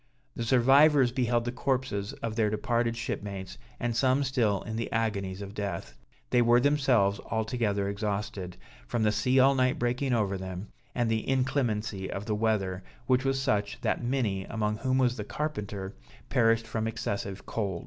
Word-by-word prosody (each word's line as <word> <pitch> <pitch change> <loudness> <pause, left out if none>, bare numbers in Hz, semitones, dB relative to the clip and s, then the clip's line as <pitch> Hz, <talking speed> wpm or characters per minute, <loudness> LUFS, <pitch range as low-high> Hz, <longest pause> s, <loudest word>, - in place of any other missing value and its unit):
The - - -3
survivors 135 +3 +5
beheld 120 -2 +1
the 120 - -1
corpses 125 -5 -1
of 115 -1 -2
their 110 -2 +2
departed 115 +2 0
shipmates, 100 - -5 0.2
and 120 -1 -1
some 130 +3 +3
still 115 -7 +1
in 110 - -5
the 115 0 -3
agonies 100 -4 -1
of 100 0 -8
death. 100 - -4 0.4
They 120 - +5
were 120 +1 +5
themselves 125 -8 +3
altogether 110 -3 0
exhausted, 100 -2 -3 0.3
from 115 - 0
the 105 - +3
sea 125 +5 +2
all 135 +1 +6
night 130 -1 +2
breaking 125 +3 0
over 100 -5 +1
them, 95 +1 -6 0.3
and 120 -1 +1
the 110 +1 -1
inclemency 115 -7 0
of 100 +1 -4
the 110 - -1
weather, 105 -4 0 0.2
which 130 0 +2
was 135 0 +1
such, 105 -7 0
that - - 0
many, 120 -7 0
among 105 -1 -1
whom 130 +3 0
was 125 -2 +2
the 105 - -3
carpenter, 105 -8 -4 0.4
perished 115 -1 +3
from 110 0 -2
excessive 100 -3 -4
cold. 100 -6 -2
115 Hz, 170 wpm, -29 LUFS, 100-125 Hz, 0.4 s, all